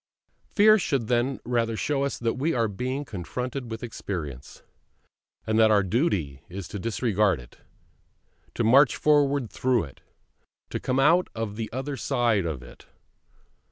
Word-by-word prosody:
Fear 215 +1 +5
should 135 - -1
then 125 +2 +1
rather 115 -2 0
show 140 +2 0
us 140 - -2
that 115 -1 -1
we 155 +5 -1
are 115 -2 +2
being 130 +7 -3
confronted 125 +6 -5
with 115 +1 -6
experience; 80 - -6 0.8
and 110 0 +1
that 110 -1 +6
our 105 -2 +4
duty 95 - -1
is 95 0 -7
to 100 - -5
disregard 105 - +1
it, - - -15 1.0
to - - 0
march 130 +5 +5
forward 145 -4 +2
through 125 -3 +1
it, 70 -5 -12 0.7
to - - -2
come 130 +1 -1
out 165 +6 +4
on 110 -2 -3
the 110 0 -5
other 135 +3 -4
side 115 -8 +1
of 70 -6 -5
it. - - -15
115 Hz, 155 wpm, -26 LUFS, 100-135 Hz, 1.0 s, that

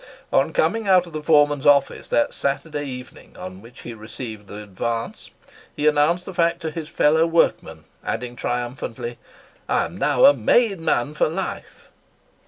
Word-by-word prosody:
On - - +3
coming 225 - 0
out 185 -2 +5
of 170 - -13
the 155 - -4
foreman's 145 -2 +3
office 145 -1 +3
that 115 - +1
Saturday 145 +1 -2
evening 125 -1 -10
on 95 +1 -8
which 115 +3 -14
he 120 - -7
received 110 -1 -8
the 105 +1 -8
advance, 115 +4 -4 0.5
he 150 - -2
announced 150 +4 +2
the 190 - -7
fact 170 -1 +1
to 160 -1 -3
his 155 -1 -6
fellow 160 +2 +3
workmen, 80 - +1 0.2
adding 125 -1 -4
triumphantly 120 -1 -4 0.5
"I - - +2
am - - -9
now - - +4
a 145 - +9
made 195 - +2
man 145 -3 0
for 155 - +1
life!" 160 - -6
145 Hz, 165 wpm, -22 LUFS, 120-160 Hz, 0.5 s, a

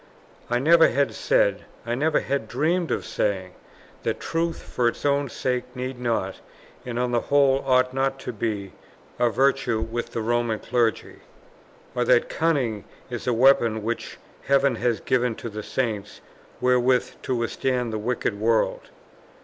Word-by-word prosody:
I 120 - +2
never 165 +6 +6
had 140 +3 +1
said, - - +1 0.2
I 120 - -2
never 150 +5 +1
had 140 -5 -2
dreamed 170 +8 0
of - - -2
saying, 95 -3 -2 0.5
that - - -2
truth 165 0 -2
for 120 - 0
its 120 - -3
own 140 -1 +2
sake 125 +1 -3
need 130 0 -5
not, 115 -6 -2 0.4
and 120 -2 -5
on 125 0 0
the 120 - +2
whole 140 -1 +4
ought 130 -1 +3
not 135 0 0
to 125 - -5
be, 105 -3 -3 0.5
a 120 -1 +4
virtue 135 -2 +1
with 115 +2 -4
the 115 - -2
Roman 120 -1 0
Clergy; 115 -1 -1 0.7
or 125 - 0
that 120 0 +3
cunning 135 -11 0 0.3
is 120 - -5
the 125 - +1
weapon 115 -3 +4
which 115 +2 -4 0.3
heaven 140 -1 +4
has 120 -1 0
given 125 -3 +1
to 115 - -6
the 105 0 -6
Saints 105 -3 -3 0.4
wherewith 125 0 +2
to 130 - -2
withstand 120 0 -1
the 110 - -2
wicked 110 -2 -2
world. 115 +1 +1
125 Hz, 155 wpm, -24 LUFS, 115-135 Hz, 0.7 s, never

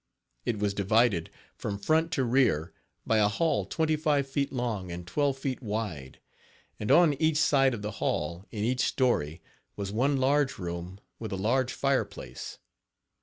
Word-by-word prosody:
It 115 - 0
was 100 -1 0
divided, 100 -3 +2 0.3
from 100 -1 -4
front 160 +8 +1
to 135 - +1
rear, 120 - +2 0.3
by 110 - +3
a 105 - +5
hall 160 +10 +1
twenty 160 -1 +1
five 150 -3 +1
feet 140 +1 -1
long 115 -8 -3
and 85 0 -6
twelve 140 +9 0
feet 135 -1 -3
wide, 105 - -4 0.6
and 105 - -3
on 170 -4 +6
each 155 -1 +3
side 135 -4 +4
of 105 - -8
the 105 - -3
hall, 85 +4 -1
in 105 -2 -4
each 125 +2 +1
story, 85 - 0 0.3
was 100 -1 -4
one 135 +6 +2
large 135 +1 +2
room 90 +1 -5 0.2
with 110 -2 -5
a - - -1
large 120 +6 +1
fire 135 -1 +1
place. 65 0 -9
115 Hz, 170 wpm, -28 LUFS, 95-135 Hz, 0.6 s, on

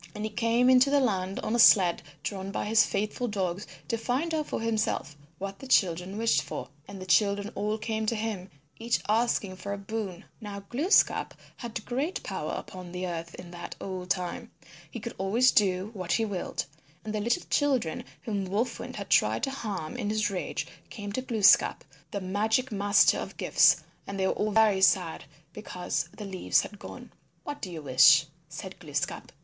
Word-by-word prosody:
And 210 - -5
he 215 - -3
came 230 +3 +2
into 260 +1 +6
the 285 0 +4
land 195 -7 0
on 215 - -2
a - - +1
sled 185 -6 +6 0.2
drawn 195 -1 -4
by 195 - -3
his 220 +1 +5
faithful 215 +5 -2
dogs 190 -3 -2 0.2
to 230 - -1
find 265 +8 -1
out 310 -2 -1
for - - -3
himself 220 -10 -1 0.2
what 195 0 -6
the 270 - -9
children 185 -3 +2
wished 230 +1 +3
for. - - -6 0.2
And 200 -1 -9
the 185 - -7
children 200 +2 +2
all 210 +2 -1
came 220 0 -3
to 230 - +1
him 210 -4 -4 0.3
each 235 +1 +1
asking 215 -3 +1
for 200 +2 -5
a - - -4
boon. 200 -3 -5 0.2
Now 205 -2 -6
Glooskap 280 - +2 0.2
had 235 -3 -6
great 275 +9 -2
power - - -4
upon 180 -2 -7
the 180 +1 -4
earth 170 -1 -5
in 175 -1 -10
that 175 0 -7
old 185 -2 -6
time. 180 -2 -2 0.4
He 235 - -7
could 235 +3 -6
always 225 +7 +4
do 190 0 +2
what 185 -4 -2
he 225 - +2
willed. 195 -4 -3 0.4
And 215 - -4
the 215 - -1
little 235 +11 0
children 265 - +1 0.2
whom 205 -4 -2
Wolf 215 +6 -1
Wind - - -7
had - - -7
tried - - +3
to 270 - 0
harm 205 -9 -5
in 215 -4 -2
his 215 -1 0
rage 185 - -3 0.2
came 205 -2 -6
to 255 - -2
Glooskap, 220 -5 +4 0.3
the 200 - -4
Magic 220 +7 0
Master 205 0 +4
of - - -7
gifts, - - +4 0.2
and 200 0 -5
they 190 - +2
were - - +2
all 215 - -1
very 210 -2 +4
sad 180 -3 +3 0.3
because 180 -4 -3
the 210 - -6
leaves 190 -2 +1
had 205 - -9
gone. - - -10 0.3
"What 290 - -6
do 185 - -5
you 160 -3 -7
wish?" 145 +3 +6 0.2
said 185 +4 -8
Glooskap. 145 -3 -4
205 Hz, 190 wpm, -28 LUFS, 185-230 Hz, 0.4 s, into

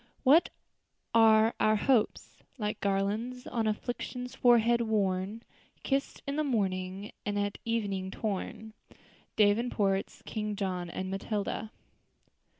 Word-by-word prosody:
"What 290 +6 +6 0.6
are 225 0 +6
our 215 0 +4
hopes? 235 +1 +1 0.2
Like 210 -3 -2
garlands, 210 +6 -1
on 225 -2 -1
afflictions's 245 +3 -4
forehead 235 -1 +4
worn, 205 -1 0 0.4
Kissed 275 0 -1
in 280 +1 -3
the 305 - +2
morning, 195 -6 -1
and 205 0 -2
at 205 0 -2
evening 200 -5 -1
torn." 215 +2 -4 0.6
DAVENPORT'S 205 -2 +1
_King 210 -1 -3
John 185 -3 -3
and 185 +2 -4
Matilda. 205 +2 -3
215 Hz, 110 wpm, -30 LUFS, 195-235 Hz, 0.6 s, What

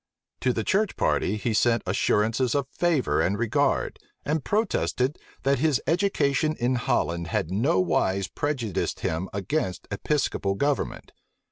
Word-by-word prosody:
To 130 - +2
the 115 -2 -2
church 210 - +1
party 105 - +1
he 110 +2 -1
sent 115 +1 +2
assurances 110 +6 +1
of 140 -2 +1
favor 165 -3 +1
and 100 +3 +1
regard, 115 0 0 0.3
and 150 -1 0
protested, 185 - 0 0.2
that 135 -1 +2
his 150 -2 +2
education 155 -4 +1
in 120 +2 +1
Holland 85 -8 0
had 85 -1 -1
nowise 95 - +1
prejudiced 130 - -2
him 80 +4 -2
against 100 - -2
Episcopal 100 -4 0
government. 140 +6 -1
120 Hz, 130 wpm, -26 LUFS, 100-145 Hz, 0.3 s, To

